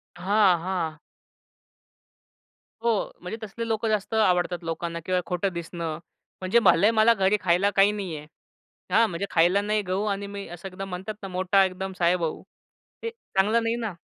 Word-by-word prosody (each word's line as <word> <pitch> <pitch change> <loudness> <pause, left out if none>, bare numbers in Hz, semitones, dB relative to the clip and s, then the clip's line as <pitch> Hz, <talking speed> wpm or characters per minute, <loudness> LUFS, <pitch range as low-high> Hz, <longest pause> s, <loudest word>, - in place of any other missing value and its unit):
हां, 190 +1 +3
हां. 175 -4 -2 1.9
हो, 230 -3 +1
म्हणजे 180 +5 -5
तसले 230 +2 -5
लोकं 225 0 -1
जास्त 215 0 -1
आवडतात 180 -4 +2
लोकांना 170 +1 -4
किंवा 185 0 +1
खोटं 180 +1 -1
दिसणं. 170 -2 -4 0.4
म्हणजे 185 +5 +3
भलंय 210 -1 +5
मला 225 +1 +5
घरी 195 -1 +2
खायला 185 +2 +3
काही 195 +1 +5
नाही 195 -6 -4
आहे 150 0 -10 0.6
हां, 230 0 +5
म्हणजे 180 +2 -3
खायला 180 +4 +4
नाही 210 +1 0
गहू 190 +1 -2
आणि 200 -1 -2
मी 200 0 -7
असं 175 +2 -8
एकदम 195 +1 -7
म्हणतात 190 +4 -5
ना 195 - -5
मोठा 185 +1 +2
एकदम 190 +1 -4
साहेब 175 +1 +3
भाऊ 165 -2 -3 0.6
हे 460 - -1
चांगलं 225 - 0
नाही 230 0 0
ना. 225 -6 -4
190 Hz, 165 wpm, -25 LUFS, 180-210 Hz, 1.9 s, भलंय